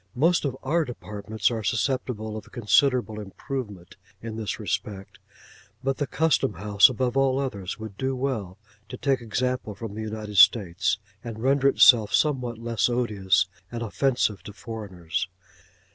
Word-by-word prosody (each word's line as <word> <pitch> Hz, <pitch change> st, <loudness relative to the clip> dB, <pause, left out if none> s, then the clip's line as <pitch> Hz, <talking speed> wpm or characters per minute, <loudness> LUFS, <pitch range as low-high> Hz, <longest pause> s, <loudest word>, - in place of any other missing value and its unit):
Most 165 Hz, +5 st, +3 dB
of 130 Hz, -2 st, -2 dB
our 165 Hz, +5 st, +1 dB
Departments 110 Hz, -4 st, -3 dB
are 115 Hz, -2 st, -2 dB
susceptible 110 Hz, -2 st, -1 dB
of 110 Hz, -, -9 dB
considerable 120 Hz, -1 st, +2 dB
improvement 105 Hz, -2 st, -7 dB, 0.2 s
in 115 Hz, -1 st, -7 dB
this 110 Hz, -2 st, -4 dB
respect, 100 Hz, -2 st, -4 dB, 0.6 s
but 135 Hz, 0 st, 0 dB
the 145 Hz, -, -1 dB
Custom 145 Hz, -6 st, +1 dB
house 100 Hz, +4 st, +5 dB
above 130 Hz, 0 st, -1 dB
all 135 Hz, -1 st, +3 dB
others 105 Hz, -9 st, -3 dB
would 110 Hz, -3 st, -9 dB
do 135 Hz, 0 st, -1 dB
well 115 Hz, -8 st, -3 dB, 0.3 s
to -, -, -7 dB
take 135 Hz, -3 st, 0 dB
example 125 Hz, -1 st, -2 dB
from 110 Hz, -2 st, -7 dB
the 110 Hz, -, -5 dB
United 110 Hz, -1 st, -5 dB
States 95 Hz, -3 st, +5 dB, 0.3 s
and 115 Hz, -1 st, -7 dB
render 135 Hz, +1 st, +3 dB
itself 115 Hz, -6 st, +6 dB
somewhat 125 Hz, -6 st, 0 dB
less 115 Hz, -2 st, 0 dB
odious 100 Hz, -7 st, +1 dB, 0.3 s
and 120 Hz, 0 st, -4 dB
offensive 115 Hz, -3 st, 0 dB
to 105 Hz, -, -10 dB
foreigners. 95 Hz, -8 st, -5 dB
115 Hz, 145 wpm, -25 LUFS, 105-130 Hz, 0.6 s, itself